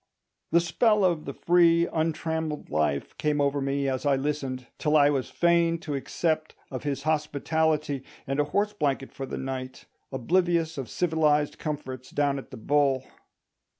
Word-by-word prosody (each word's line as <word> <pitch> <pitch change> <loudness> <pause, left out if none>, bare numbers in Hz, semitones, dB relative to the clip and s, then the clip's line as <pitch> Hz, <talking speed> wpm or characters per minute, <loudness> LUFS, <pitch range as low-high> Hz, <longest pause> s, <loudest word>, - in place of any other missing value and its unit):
The 170 - +6
spell 205 +5 +3
of 170 -4 +1
the 140 - -5
free 170 -1 +4
untrammelled 160 -1 -2
life 75 -2 0
came 150 -1 +1
over 140 0 +1
me 140 0 0
as 130 -1 -1
I 145 -2 +3
listened, 135 -2 -3
till 155 0 +3
I 145 0 +5
was 135 -3 -1
fain 170 -1 +3
to 155 -5 -4
accept 155 +3 -1 0.2
of 130 - -4
his 140 -2 -3
hospitality 150 -1 0 0.2
and 135 +2 -2
a 145 - +3
horse 205 +7 0
blanket 140 -7 -1
for 135 - -6
the - - -5
night, 130 -1 -5 0.3
oblivious 165 +3 +1
of 130 - -5
civilised 155 -4 +1
comforts 130 -4 -5
down 140 -1 0
at 135 - -11
the 130 - -9
Bull. 135 +2 +2
150 Hz, 160 wpm, -27 LUFS, 135-160 Hz, 0.3 s, The